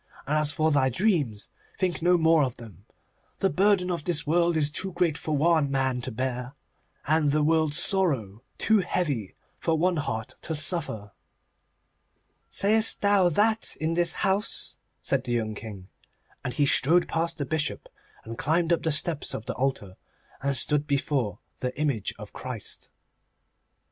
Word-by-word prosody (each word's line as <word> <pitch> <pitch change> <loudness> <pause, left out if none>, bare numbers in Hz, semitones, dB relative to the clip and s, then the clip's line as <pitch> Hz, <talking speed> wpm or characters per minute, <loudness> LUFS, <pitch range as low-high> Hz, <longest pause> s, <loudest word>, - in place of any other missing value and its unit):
And 150 - -1
as 150 -1 +2
for 155 +1 +1
thy 135 -3 +3
dreams, 140 - 0 0.3
think 180 -4 -1
no 175 +1 +4
more 160 -1 +4
of 125 -3 -2
them. 105 -5 -13 0.5
The 195 - +1
burden 190 -2 +2
of 170 -4 -3
this 165 -3 +2
world 170 +1 +2
is 150 -1 +2
too 190 +4 -3
great 175 -3 +1
for 155 -1 -2
one 160 -1 +3
man 130 -2 0
to 130 - -5
bear, 125 +2 -4 0.5
and 155 0 +2
the 150 +1 +2
world's 155 -1 +2
sorrow 135 - +1 0.2
too 220 -1 +3
heavy 145 - -2 0.2
for 165 -1 0
one 175 +2 +1
heart 130 -4 -4
to 160 - -3
suffer.' 145 - -1 1.4
'Sayest 215 +2 +2
thou 200 -3 +4
that 215 +6 +1
in 160 +1 -1
this 175 0 +2
house?' 195 +2 -2 0.2
said 135 -2 0
the 120 - -2
young 110 -2 -1
King, 100 -3 -9 0.6
and 125 - -4
he 145 - +3
strode 165 +5 +4
past 165 +1 -2
the 145 - -2
Bishop, 155 +1 -3 0.4
and 115 +1 -8
climbed 165 +4 +1
up 170 - 0
the 160 - 0
steps 150 +1 -1
of 110 - -6
the - - -3
altar, 125 -8 -3 0.4
and 140 0 0
stood 150 0 +2
before 140 -6 -1 0.2
the 125 +2 -4
image 135 -10 -1
of - - -11
Christ. - - -5
150 Hz, 165 wpm, -26 LUFS, 130-175 Hz, 1.4 s, no